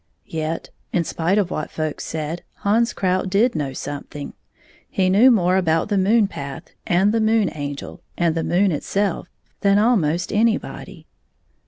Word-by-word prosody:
Yet, 160 0 -4 0.2
in 175 - +1
spite 170 +4 0
of 195 -4 +1
what 155 - -3
folks 155 -1 -4
said, 160 +2 -4 0.2
Hans 230 +4 +3
Krout 185 0 0
did 215 +6 +3
know 145 -4 -2
something. 145 +1 -7 0.6
He 185 -1 +1
knew 220 +7 +6
more 185 -6 +3
about 165 -1 +1
the 205 - +1
moon 210 +3 +4
path, 140 -7 -8 0.2
and 190 +4 +3
the 225 0 +1
Moon 220 -2 +2
Angel, 145 -2 -6 0.2
and 170 -2 +2
the 165 0 -1
moon 190 +2 +2
itself 195 +4 -1 0.3
than 200 0 +3
ahnost 185 -6 +2
anybody. 225 +2 -1
185 Hz, 155 wpm, -21 LUFS, 160-205 Hz, 0.6 s, knew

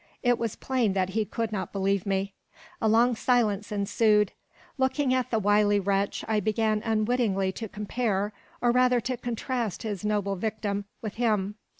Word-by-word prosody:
It 245 -1 +3
was 230 -3 -2
plain 250 -7 0
that 190 -1 0
he 215 +2 0
could 225 +1 -3
not 200 -3 -3
believe 195 -1 0
me. 195 0 -1 0.5
A 220 - +2
long 235 +3 +4
silence 215 -4 +1
ensued. 210 +1 +2 0.5
Looking 265 0 +2
at 255 -1 0
the 225 - +1
wily 205 0 +3
wretch, 195 0 0
I 220 -1 +2
began 215 +1 +1
unwittingly 215 -3 +1
to 220 +2 -6
compare, 210 -1 -1 0.3
or 240 - +4
rather 250 0 +4
to 255 +3 -2
contrast 240 -2 -3
his 210 -4 -4
noble 205 -2 0
victim 205 0 -2 0.2
with 215 - -4
him. 210 -4 +1
215 Hz, 165 wpm, -27 LUFS, 200-235 Hz, 0.5 s, long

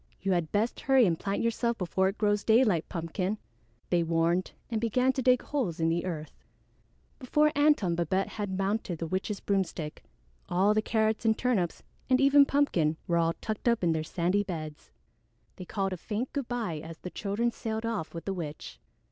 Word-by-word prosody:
"You 195 - -1
had 175 -3 0
best 215 +3 0
hurry 265 -3 +4
and 165 -4 +1
plant 200 +2 -2
yourself 235 0 0
before 190 +1 +1
it 195 - -6
grows 205 -1 +1
daylight, 220 -7 +3
Pumpkin," 180 +4 -2 0.5
they 175 -1 +3
warned 165 +2 +1 0.2
and 220 -2 -1
began 250 +3 +2
to 260 - -2
dig 255 0 +4
holes 230 - -2
in 165 0 +2
the 170 +2 0
earth. 155 -4 -5 0.9
Before 300 +3 +2
Antone 290 -10 +3
and 170 - 0
Babette 185 +3 0
had 205 -3 -4
mounted 195 -2 -1
the 165 - -3
witch's 190 +4 -2
broomstick, 185 -6 -2 0.5
all 190 +4 +3
the 215 - +2
Carrots 220 0 0
and 220 -1 +3
Turnips 215 -9 0 0.3
and 255 0 +4
even 280 +1 +6
Pumpkin 170 - +2
were 170 - +1
all 165 0 +2
tucked 215 +2 -4
up 235 -4 +2
in 170 - +3
their 160 -1 0
sandy 175 +5 0
beds. 155 -6 -6 0.7
They 185 - -7
called 195 0 -2
a - - -4
faint 220 +8 -4
good 280 -4 -2
by 225 -10 -2
as 160 +1 -9
the 180 - -8
children 215 +4 -1
sailed 220 0 -4
off 225 -8 -3
with 165 - -6
the 195 - -1
witch. 150 - -7
195 Hz, 190 wpm, -29 LUFS, 170-230 Hz, 0.9 s, even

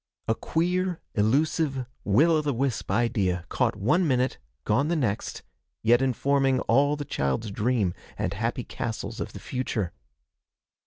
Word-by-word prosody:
A 110 - +3
queer, 180 +6 0
elusive, 135 +4 +1 0.2
will 135 +12 +4
o' 155 -1 +3
the 145 -3 -1
wisp 130 -1 -1
idea, 100 -5 +1
caught - - +1
one 160 - +2
minute, 130 -1 +1 0.3
gone 130 +8 +2
the 170 - +1
next, 115 -9 -2 0.4
yet 120 +3 +5
informing 135 0 +2
all 140 +5 +3
the 145 -1 -5
child's 70 - -1
dreams 105 -3 +1 0.2
and - - -1
happy - - -2
castles - - -5
of - - -4
the - - -7
future. 110 -8 -3
130 Hz, 145 wpm, -26 LUFS, 110-145 Hz, 0.4 s, yet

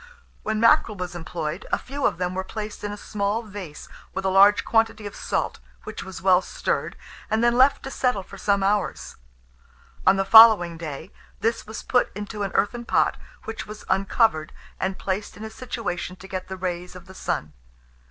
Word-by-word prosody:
When 220 0 -1
mackerel 230 -1 +4
was 180 0 -4
employed, 165 0 -5
a - - +3
few 280 +2 -1
of - - -2
them 180 0 -2
were 190 +1 -2
placed 210 +2 -7
in 205 - -3
a 205 - -6
small 205 +2 -2
vase, 195 -8 -9 0.3
with 190 - -3
a - - +3
large 200 +2 +6
quantity 225 -1 +1
of 205 - -7
salt, - - -2 0.2
which - - -7
was 190 -1 -9
well 185 -1 +5
stirred, - - -2 0.3
and 220 +2 +1
then 240 0 +4
left 260 +3 +4
to 270 - -6
settle 250 -8 0
for 195 +1 -12
some 200 0 +1
hours. 205 0 -1 0.9
On 190 - +7
the 195 0 0
following 220 -7 +8
day, 160 +1 -7 0.3
this 230 -1 -1
was 220 +1 -7
put 245 - +2
into 210 0 -6
an 200 - -1
earthen 235 +4 +1
pot, - - +2 0.3
which 225 0 -6
was 215 0 -9
uncovered, 195 -4 +2 0.3
and 190 0 -2
placed 195 +2 -3
in 210 - -9
a 220 - -6
situation 215 -7 -4
to 190 +1 -12
get 185 -1 -5
the 190 - -6
rays 180 -1 -4
of 180 - -11
the 190 - -13
sun. 75 - -3
200 Hz, 190 wpm, -24 LUFS, 185-220 Hz, 0.9 s, following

